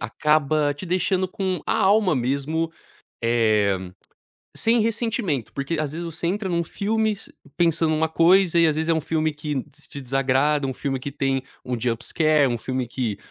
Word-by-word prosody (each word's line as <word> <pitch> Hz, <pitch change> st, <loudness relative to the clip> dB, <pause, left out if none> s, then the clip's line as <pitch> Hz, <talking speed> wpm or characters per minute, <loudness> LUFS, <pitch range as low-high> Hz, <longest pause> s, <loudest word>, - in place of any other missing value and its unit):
acaba 150 Hz, -1 st, +1 dB
te 145 Hz, +6 st, -9 dB
deixando 185 Hz, +1 st, 0 dB
com 190 Hz, -2 st, -2 dB
a 225 Hz, -, +1 dB
alma 200 Hz, -4 st, +3 dB
mesmo, 140 Hz, +6 st, -1 dB, 0.5 s
eh, 110 Hz, -4 st, +2 dB, 0.8 s
sem 230 Hz, +1 st, +2 dB
ressentimento. 220 Hz, -, -1 dB
Porque, 140 Hz, +4 st, -2 dB
às 150 Hz, -2 st, -2 dB
vezes, 165 Hz, +3 st, -5 dB
você 170 Hz, 0 st, -5 dB
entra 195 Hz, +2 st, -2 dB
em -, -, -2 dB
um 170 Hz, 0 st, +1 dB
filmes 215 Hz, +3 st, -2 dB, 0.2 s
pensando 165 Hz, -2 st, +2 dB
em -, -, +2 dB
uma 160 Hz, 0 st, +1 dB
coisa 170 Hz, +2 st, +4 dB
e 165 Hz, -, +6 dB
às 155 Hz, -, +1 dB
vezes 160 Hz, +1 st, -1 dB
é -, -, +5 dB
um 160 Hz, -, 0 dB
filme 155 Hz, 0 st, 0 dB
que 150 Hz, -2 st, -3 dB
te 150 Hz, +2 st, -17 dB
te 140 Hz, -3 st, -8 dB
desagrada, 135 Hz, +2 st, +1 dB
um 130 Hz, -, -3 dB
filme 135 Hz, 0 st, -3 dB
que 140 Hz, +2 st, -5 dB
tem 135 Hz, -1 st, -1 dB, 0.2 s
um 125 Hz, -2 st, -3 dB
jump 115 Hz, -1 st, -1 dB
scare, 155 Hz, -3 st, +3 dB
um 120 Hz, -1 st, -1 dB
filme 130 Hz, +1 st, -3 dB
que 120 Hz, -4 st, -3 dB
155 Hz, 190 wpm, -23 LUFS, 135-175 Hz, 0.8 s, e